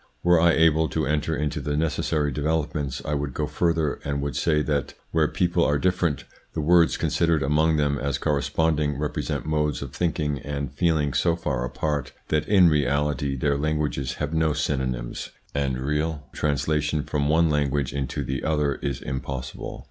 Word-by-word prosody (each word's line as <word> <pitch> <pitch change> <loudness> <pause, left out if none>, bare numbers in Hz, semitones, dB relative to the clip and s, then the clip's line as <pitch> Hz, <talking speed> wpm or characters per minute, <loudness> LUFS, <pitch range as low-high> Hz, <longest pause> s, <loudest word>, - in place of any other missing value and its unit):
Were 90 -1 +5
I 85 -1 +5
able 80 -1 +4
to - - -1
enter 75 +2 0
into 75 -1 -2
the 75 0 -2
necessary 75 -1 0
developments, 75 -2 -2
I 75 - -1
would 70 -2 -2
go 75 - 0
further 80 0 0
and 70 0 -2
would 70 0 -3
say 75 -2 +2
that 70 -4 -1 0.2
where 80 -2 +3
peoples 85 -1 +1
are 70 - +2
different, 85 -2 0 0.3
the - - -3
words 85 +2 +4
considered 85 -3 +1
among 80 +3 +2
them 70 -2 +1
as 70 +1 -1
corresponding 75 0 0
represent 75 +1 -2
modes 75 -3 0
of - - -8
thinking 75 -5 -1
and 70 -2 -4
feeling 80 -5 +1
so 85 +4 +2
far 70 -7 -2
apart, 70 +2 -2 0.2
that 75 -1 +1
in 95 -4 +6
reality 70 -2 +1
their 70 +1 0
languages 75 -3 -1
have 75 +1 -3
no 80 -1 +2
synonyms, 65 -5 -2 0.2
and 65 -3 -1
real 75 +2 -1
translation 75 +1 0
from 70 0 -1
one 80 +1 +4
language 70 -2 0
into 70 -3 -2
the 65 0 -3
other 75 -3 +1
is 70 -3 -3
impossible. 65 0 -5
75 Hz, 170 wpm, -25 LUFS, 70-80 Hz, 0.3 s, in